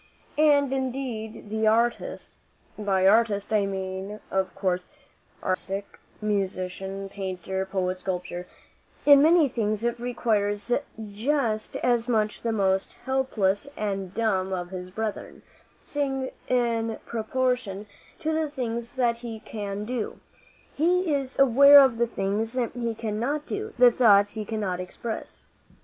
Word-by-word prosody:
And 285 -3 +4
indeed 250 -5 -4
the 220 0 +1
artist 235 +2 0 0.4
by 195 -3 +1
artist, 210 -1 +3
I 205 -2 +3
mean, 190 +1 -4
of 190 -1 -1
course, 185 -2 -1 0.6
architect, 195 +2 -3 0.2
musician, 195 -1 -2
painter, 190 -1 -4
poet, 185 -1 -1
sculptor 180 -1 -4 0.6
in 285 -1 +8
many 320 0 +6
things 215 -4 -1 0.2
requires 220 -3 -1
it 280 +4 +1 0.2
just 220 +1 -1
as 240 -1 +1
much 215 -3 +1
as - - -18
the 230 - -1
most 195 -3 +1
helpless 260 -4 0
and 195 -3 -2
dumb 195 -3 0
of 175 -1 -4
his 180 -1 -6
brethren, 215 +2 -5 0.4
seeing 270 -2 -2 0.2
in 230 -2 0
proportion 235 -3 -1 0.4
to 315 -1 0
the 315 -1 0
things 235 -4 -4
that 240 -3 +2
he 235 -2 -7
can 205 -1 -5
do, 240 -1 -4 0.5
he 350 +2 +2
is 270 -2 -2
aware 280 +2 +8
of 260 -4 +4
the 235 - +3
things 220 +3 -2 0.2
he 235 -2 -2
cannot 235 +7 -2
do, 430 +1 -4
the 245 0 +7
thoughts 205 -4 +5
he 215 -1 -4
cannot 205 -4 -2
express. 220 +5 -6
220 Hz, 130 wpm, -26 LUFS, 195-250 Hz, 0.6 s, in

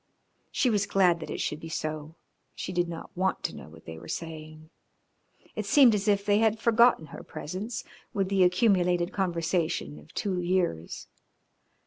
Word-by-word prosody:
She 250 - +2
was 205 -2 +1
glad 180 -3 +3
that 160 - -7
it - - -4
should 150 - -2
be 165 - -8
so, 155 -1 -4 0.4
she 185 - -5
did 175 -1 0
not 165 +2 -8
want 190 +1 0
to - - -3
know - - -10
what 80 0 -16
they 80 0 -8
were 85 - -12
saying. 155 -1 -7 0.8
It - - -3
seemed 270 -6 +7
as 200 -1 -1
if 200 -1 +2
they 205 0 +3
had 220 0 +3
forgotten 235 -5 +4
her 145 - -10
presence 210 +8 -5 0.3
with 195 -2 0
the 195 0 +1
accumulated 180 -2 +3
conversation 170 - -1
of 75 - -17
two 190 -3 -1
years. 175 - -1
180 Hz, 170 wpm, -28 LUFS, 155-200 Hz, 0.8 s, seemed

